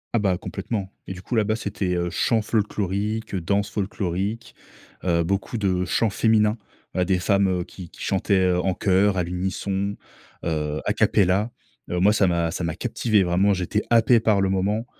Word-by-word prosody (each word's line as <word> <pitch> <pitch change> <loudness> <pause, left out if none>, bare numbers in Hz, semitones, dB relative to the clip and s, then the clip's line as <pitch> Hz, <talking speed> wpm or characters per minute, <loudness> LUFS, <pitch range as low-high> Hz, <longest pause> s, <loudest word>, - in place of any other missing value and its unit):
Ah - - +4
bah 95 -4 +1
complètement, 100 0 -5
et - - -4
du 90 0 -11
coup 120 - -3
là-bas, 110 -1 +2
c'était, 100 -4 -2
heu, 85 0 -1
chant 115 -2 +1
folklorique, 105 0 -1
danse 100 +3 0
folklorique, 100 +2 -3 0.5
heu, 85 -2 +2
beaucoup 100 +6 -2
de 95 -3 0
chants 110 +3 +1
féminins, 105 0 +3 0.4
des 90 0 +1
femmes, 100 +2 +2
heu, 90 -1 0
qui 90 -1 -11
qui - - -18
chantaient, 95 0 +1
heu, 90 - +2
en 95 -1 0
chœur, 95 +1 +2
à 90 - +2
l'unisson, 95 +3 -2 0.5
heu, 75 -2 -2
à - - +1
capella. 100 +4 +2 0.4
Heu, 90 - -1
moi, 100 +3 +5
ça 100 -3 +3
m'a 85 -2 0
ça 90 - -4
m'a 85 -1 -2
captivé 105 +3 +1
vraiment. 95 +3 +2
J'étais 95 +3 -1
happé 115 0 +5
par 110 -3 +2
le 95 -1 +2
moment. 100 +4 0
95 Hz, 180 wpm, -24 LUFS, 90-105 Hz, 0.5 s, moi